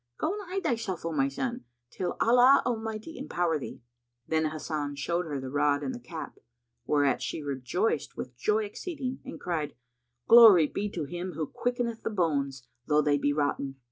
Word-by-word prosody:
Go 330 - 0
and 415 - -5
hide 385 +1 -2
thyself, 210 -8 -2
O 165 - -1
my 135 -3 +2
son, 240 - -3 0.3
till 180 -2 -3
Allah 250 +3 +6
Almighty 225 +4 -3
empower 175 - 0
thee." 130 - -8 0.5
Then 160 0 +1
Hasan 150 -2 -4
showed 170 +4 -1
her 145 -3 -3
the 130 -1 -6
rod 145 0 +2
and 260 - -2
the 245 - -7
cap, 165 -8 -8 0.5
whereat 145 -3 +2
she 130 +4 -4
rejoiced 140 - -1
with 125 -1 -6
joy 210 - +1
exceeding 265 - -5
and - - -8
cried, 155 -4 -3 0.5
"Glory 225 -8 +9
be 205 +7 -3
to 175 -5 -4
Him 175 +5 -5
who 155 0 -2
quickeneth 240 - -2
the - - -2
bones, 140 - -1 0.2
though 150 0 +3
they 145 -1 +2
be 145 - +1
rotten! 145 -2 -1
165 Hz, 175 wpm, -28 LUFS, 145-225 Hz, 0.5 s, Glory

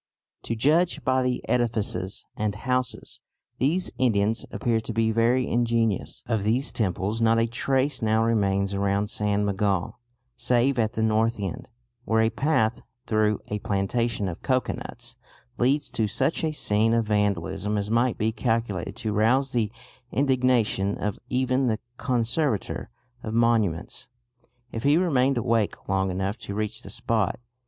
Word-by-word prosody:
To 115 - -2
judge 150 +5 +2
by 130 +1 +2
the 125 -1 -1
edifices 110 -5 -1
and 105 -1 -1
houses 125 -1 -2 0.4
these 165 +8 +1
Indians 110 -3 +1
appear 115 -2 0
to 110 - -5
be 110 0 +2
very 120 +3 +2
ingenious." 115 -4 0
Of 115 -3 0
these 115 +7 0
temples 105 +1 -1
not 115 0 +4
a 115 - +3
trace 130 +4 0
now 110 0 +2
remains 100 -3 +1
around 100 +1 0
San 105 0 0
Miguel 100 +1 -1 0.4
save 125 +1 +2
at 110 -1 +1
the 110 - -1
north 110 +1 +2
end, 115 +6 -5 0.3
where 110 -2 +2
a 110 - +2
path 120 -3 +1 0.2
through 110 -1 +1
a 105 - -2
plantation 105 +2 -1
of 85 - -6
cocoanuts 120 -2 -2 0.4
leads 140 +3 +2
to 110 -1 0
such 145 +11 0
a 160 - +1
scene 110 -5 +2
of 115 -1 +1
vandalism 105 0 0
as 100 +1 -2
might 120 +1 +2
be 110 +1 +1
calculated 115 -6 -1
to 110 -4 -3
rouse 125 +6 +2
the 110 -3 0 0.4
indignation 125 -7 +2
of 105 -1 -3
even 130 +1 +1
the 110 -2 +1 0.2
Conservator 125 -3 -1 0.3
of 110 0 -4
Monuments, 115 -4 +1 0.6
if 115 - -4
he 145 +5 +4
remained 135 -7 +2
awake 115 -3 0
long 95 0 +1
enough 95 +4 -2
to 100 - -6
reach 110 +1 -3
the - - -10
spot. 110 -3 -1
115 Hz, 150 wpm, -25 LUFS, 105-125 Hz, 0.6 s, not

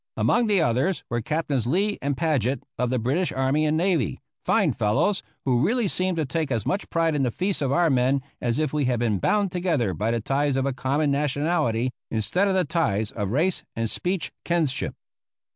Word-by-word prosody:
Among 240 -1 +2
the 200 -5 +3
others 135 +9 0
were 120 0 0
Captains 140 -3 -1
Lee 200 +9 +1
and 140 -1 -1
Paget 140 -6 0 0.2
of 125 - +1
the 130 - 0
British 135 +10 0
army 135 +4 +1
and 155 +1 +1
navy, 175 -2 +1 0.2
fine - - +2
fellows, 110 - +1 0.2
who 125 -2 +2
really 230 +5 +2
seemed 185 -1 0
to 160 - 0
take 155 +1 -2
as 115 -4 -1
much 195 - -2
pride 165 -2 +1
in 145 - 0
the 130 - +2
feats 185 - -2
of 135 -2 0
our 170 +1 +3
men 130 +1 +2 0.2
as 120 -1 0
if 155 -2 0
we 150 -2 +1
had 125 -2 +1
been 110 -5 +1
bound 205 - +1
together 165 - 0
by 105 +7 -1
the 115 0 +1
ties 140 +4 0
of 135 - +1
a 140 - 0
common 140 +3 0
nationality 140 -4 0 0.2
instead 115 - +1
of 195 - +1
the 185 -2 +2
ties 110 - 0
of 105 -3 -3
race 160 - +1
and 115 -1 -2
speech 180 -1 -2
kinship. 165 -6 0
145 Hz, 205 wpm, -25 LUFS, 125-170 Hz, 0.2 s, the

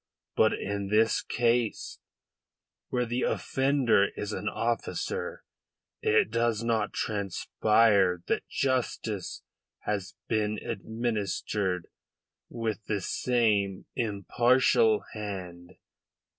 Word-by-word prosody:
But - - +4
in 100 0 -3
this 110 +2 +3
case, 120 -1 0 0.9
where 125 -1 0
the 120 +2 -2
offender 135 -7 +2
is 105 +1 -3
an 105 +2 -2
officer, 115 0 -2 0.6
it 110 0 +3
does 115 -1 +1
not 115 -2 0
transpire 100 -2 +2
that - - -1
justice 120 -6 -2 0.4
has 100 -3 -3
been 105 -1 0
administered 105 -4 -2 0.6
with 115 -2 -3
the 105 -2 0
same 105 -4 +1
impartial 115 +1 +3
hand." 90 -4 -7
110 Hz, 90 wpm, -28 LUFS, 100-115 Hz, 0.9 s, But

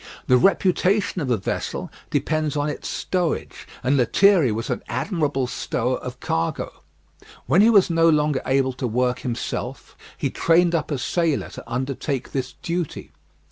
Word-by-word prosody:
The 125 - +5
reputation 190 - +2
of 135 - -2
a 120 - +2
vessel 95 - -4 0.2
depends 150 +1 0
on 145 +1 0
its 150 - -5
stowage, 180 -3 -2 0.2
and 135 +3 +2
Lethierry 160 - +4
was 115 +2 -3
an - - -2
admirable 140 - -1
stower 125 - -2
of - - -8
cargo. 80 0 -2 0.6
When 160 - +4
he 220 - +6
was 200 -6 +5
no 165 0 +4
longer 150 -3 +2
able 130 0 +2
to 125 0 -3
work 125 +2 0
himself, 120 -3 -4 0.2
he - - -1
trained 170 +1 +3
up 165 -3 0
a 145 - -1
sailor 165 +3 0
to - - -11
undertake 130 +2 -3
this 130 -1 -3
duty. 170 -2 -3
145 Hz, 155 wpm, -23 LUFS, 130-170 Hz, 0.6 s, he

